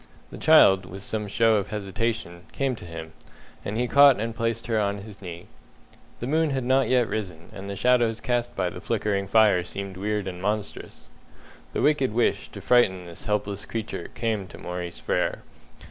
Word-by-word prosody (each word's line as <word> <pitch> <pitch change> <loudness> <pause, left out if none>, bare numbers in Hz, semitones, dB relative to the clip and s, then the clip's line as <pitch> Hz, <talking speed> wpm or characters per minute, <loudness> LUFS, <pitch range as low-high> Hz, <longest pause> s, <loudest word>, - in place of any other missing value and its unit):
The - - -9
child, 95 -1 +6
with 95 +2 -8
some 105 -1 -2
show 115 +1 +3
of 100 -1 -2
hesitation, 100 -3 -3
came 135 -2 0
to 100 - -10
him, 80 -1 -8 0.5
and 105 - -3
he 125 +1 +1
caught 140 0 +7
and 115 +1 -2
placed 115 0 -2
her 115 -2 +1
on 100 -1 0
his 105 -2 -12
knee. 85 -2 -8 0.8
The - - -2
moon 155 +4 +2
had 135 -2 -1
not 130 +2 +2
yet 125 -2 +3
risen, 90 -7 -5
and 100 +1 -8
the 100 - -4
shadows 120 -1 +2
cast 120 0 -1
by 90 -2 -1
the 90 - -9
flickering 100 -3 -1
fire 105 -3 +5
seemed 95 +1 -6
weird 105 0 -2
and 90 -1 -6
monstrous. 105 +1 -4 0.6
The - - -1
wicked 140 -6 +2
wish 120 - +1
to - - -9
frighten 95 -7 +3
this 85 -1 -10
helpless 105 -1 -2
creature 115 -1 -4
came 110 -4 -1
to - - -12
Maurice 90 -1 -5
Frere. - - -1
105 Hz, 185 wpm, -25 LUFS, 95-115 Hz, 0.8 s, caught